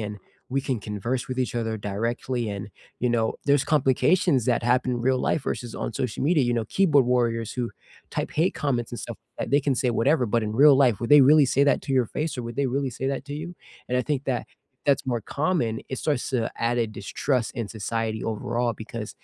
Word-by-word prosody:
and 105 -1 -5 0.4
we - - +3
can 130 -5 -2
converse 115 +5 -3
with 130 - -4
each 125 -2 -1
other 115 -2 -1
directly." 115 +3 -2
And, 100 0 -6 0.3
you 125 - +1
know, 115 -1 +1
there's 140 -1 +4
complications 140 0 +3
that 120 -2 +2
happen 125 0 +1
real 130 +1 +2
life 155 - +1
versus 120 -2 -4
on - - -3
social 125 +1 -3
media, 155 -2 +3
you 120 - +1
know, 115 - 0
keyboard 145 -8 +3
warriors 115 -2 +1
who 120 -2 -3 0.4
type - - -3
hate 165 +5 +2
comments 120 -5 -1
and 120 - -5
stuff, - - -7 0.2
th - - -3
they 145 - +5
can 135 - +3
say 125 - +2
whatever, 135 +2 +3
but 115 +1 +1
in 105 - -3
real 145 -2 +8
life, 120 -4 +3
would 120 - -3
they 145 -2 +9
really 150 -2 +6
say 140 - +4
that 145 - +3
to 135 - -3
your 125 -3 +3
face, 155 -2 -1
or 125 - -2
would 120 +2 -7
they 140 -1 +1
really 140 -1 0
say 135 - -3
that 135 0 -4
to 145 - -5
you? 170 - -6 0.4
And 125 - 0
I - - +1
think 145 -3 0
that 125 - -1 0.4
that's 140 -1 +2
more 120 -3 -1 0.2
common. 155 -8 +1 0.2
It - - -2
starts 145 -5 0
to 125 - +2 0.3
add 120 0 0
a 115 - +2
distrust 125 +3 -1
in 110 - -2
society 110 +1 -2
overall 120 +2 -1
because 110 -1 -6
125 Hz, 230 wpm, -25 LUFS, 115-140 Hz, 0.4 s, they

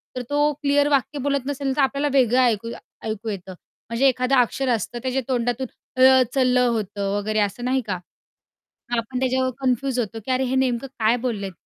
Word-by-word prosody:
तर 250 - -2
तो 290 +1 +2
क्लिअर 285 0 +3
वाक्य 280 0 0
बोलत 280 -1 -1
नसेल 275 -1 -2
तर 290 - +2
आपल्याला 280 +2 +1
वेगळं 250 -1 +4
ऐक 230 -3 +2 0.4
ऐकू 220 0 -4
येतं. 190 -2 -6 0.4
म्हणजे 235 +4 +2
एखादं 255 +1 +2
अक्षर 255 +1 +1
असतं 240 0 -1
त्याच्या 260 +1 0
तोंडातून 245 0 -1 0.3
'ळ' 260 0 +7
च - - -4
'ल' 250 0 +3
होतं 210 -5 0
वगैरे 215 +1 -1
असं 210 +4 -1
नाही 260 +1 +1
का? 185 - -1 1.0
आपण 230 +2 -3
त्याच्यावर 260 0 +1
कन्फ्यूज 260 0 0
होतो 225 -1 -3
की 260 - -2
अरे 255 +1 +1
हे 260 +1 -1
नेमकं 260 0 0
काय 220 +2 +3
बोललेत 200 -5 -2
255 Hz, 185 wpm, -23 LUFS, 230-265 Hz, 1.0 s, ळ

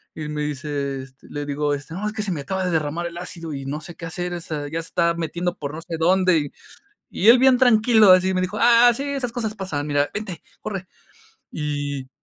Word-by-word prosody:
Y 155 - -7
él 150 - -5
me 150 0 -3
dice, 140 -2 -3
este, 135 0 -17
le 145 0 -4
digo, 145 0 -1
este: 145 +3 -6
"No, 205 +3 -4
es 210 - -3
que 220 - -3
se 195 - -2
me 155 - -2
acaba 190 +6 -2
de 180 - 0
derramar 160 +2 -1
el 170 0 -9
ácido 170 -3 -6
y 135 -1 -6
no 150 +3 -4
sé 170 +2 -10
qué 165 - -8
hacer. 175 +2 -4
O 175 - -4
sea, 150 -3 -4
ya 165 +2 -3
se 165 - -7
está 170 -1 +2
metiendo 170 +2 -2
por 145 0 -5
no 160 - -6
sé 165 -1 -5
dónde". 185 +1 +4
Y 145 -2 -4 0.6
y 200 - -1
él 245 - +9
bien 260 -1 +6
tranquilo, 220 -4 +6
así 185 +1 +5
me 185 - +1
dijo: 185 +4 -2
"Ah, 240 0 +7
sí, 275 - -4
esas 275 -4 -2
cosas 220 -3 -3
pasan. 155 -7 -3
Mira, 145 0 +1
vente, 205 -5 -5 0.2
corre". 195 -4 -5 0.6
Y 145 -3 -3
170 Hz, 245 wpm, -23 LUFS, 145-195 Hz, 0.6 s, él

